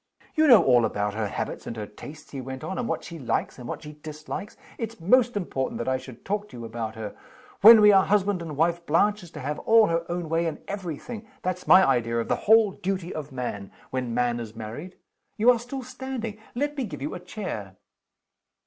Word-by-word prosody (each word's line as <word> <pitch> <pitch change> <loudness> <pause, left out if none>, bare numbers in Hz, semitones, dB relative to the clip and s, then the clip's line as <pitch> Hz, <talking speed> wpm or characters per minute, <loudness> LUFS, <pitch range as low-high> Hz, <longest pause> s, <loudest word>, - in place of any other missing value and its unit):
"You 315 0 +4
know 230 - +8
all 125 -2 +5
about 105 -1 -1
her 110 0 -1
habits - - -5
and 115 - -5
her 105 - -4
tastes," 145 +8 -12
he 135 - -5
went 130 +1 -7
on, 190 +7 -4
"and 245 - -2
what - - -2
she 170 -1 -8
likes, 130 0 -2
and 120 - -8
what - - -5
she 150 0 -9
dislikes. 155 +6 -7 0.2
It's 225 -2 -5
most 240 +6 +3
important 135 -9 -2
that 120 - -4
I 130 0 +2
should 130 -2 -12
talk 205 +1 -2
to - - -11
you 115 - -7
about 110 -1 -5
her. 110 -2 -6 0.5
When 225 +2 +11
we 210 0 +8
are 195 -1 +5
husband 200 -2 +2
and 155 -4 -6
wife, 170 +2 +1
Blanche 205 +7 +3
is 175 - -12
to 155 - -9
have 150 +3 -3
all 225 -3 +5
her 165 0 0
own 175 -1 -3
way 165 +1 +1
in 160 - -5
every 185 -6 -4
thing. 225 +2 -8 0.2
That's 180 0 -3
my 190 0 +8
idea 115 -1 +1
of 115 - -2
the - - +3
Whole 220 -2 +7
Duty 185 -1 -3
of 150 -2 -6
Man 120 -6 -5 0.2
when 130 -2 -2
Man 120 0 0
is 115 -1 -7
married. 115 +12 -8 0.4
You 230 +4 +6
are 240 - +1
still 255 +3 -6
standing? 250 -4 -6 0.2
Let 290 +3 -1
me 270 -4 -2
give 150 -9 -7
you 150 - -3
a 180 - -5
chair." 175 - -6
165 Hz, 230 wpm, -26 LUFS, 125-210 Hz, 0.5 s, When